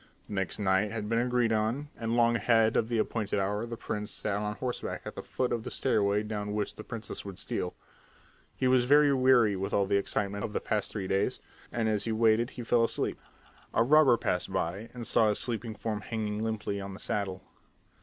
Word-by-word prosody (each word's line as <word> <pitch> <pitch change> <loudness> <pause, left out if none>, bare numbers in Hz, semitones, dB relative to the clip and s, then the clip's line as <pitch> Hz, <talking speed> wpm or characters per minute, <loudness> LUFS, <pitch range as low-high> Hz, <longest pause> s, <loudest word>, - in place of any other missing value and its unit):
The - - -9
next 95 -1 -1
night 95 0 +2
had 110 -2 -4
been 115 +1 +1
agreed 120 -1 +2
on, 115 +7 -1
and 115 0 -2
long 120 0 +4
ahead 115 0 +3
of 115 - +1
the 120 - 0
appointed 110 -1 -1
hour 105 +4 -1
the 115 0 -6
prince 105 -1 -3
sat 105 -1 -2
on 105 0 -2
horseback 125 +2 -4
at - - -6
the - - -6
foot 125 - -2
of 115 - -1
the - - -5
stairway 105 -5 +1
down 105 -1 -4
which 105 -1 -1
the 110 - -9
princess 115 -2 -6
would 100 -2 -8
steal. 90 -1 -3 0.8
He 130 - +1
was 125 -1 +4
very 145 +2 +5
weary 130 -5 +4
with 95 +1 -2
all 100 - +3
the 100 - +2
excitement 100 0 -1
of 105 - -4
the - - 0
past 105 -3 -1
three 100 -3 -4
days, 95 +1 0 0.3
and 115 -2 0
as 105 -1 0
he 115 - -1
waited 110 +1 +3
he 120 - -7
fell 115 0 +3
asleep. 115 - -1 0.6
A 115 - +5
robber 135 -2 +6
passed 90 -2 -1
by 95 +4 -2
and 120 -2 -7
saw 110 -1 +4
his 105 - +1
sleeping 115 -2 -1
form 105 0 -3
hanging 110 -1 -3
limply 105 -2 -2
on 95 0 -6
the - - -11
saddle. 95 -2 -3
110 Hz, 215 wpm, -29 LUFS, 100-115 Hz, 0.8 s, robber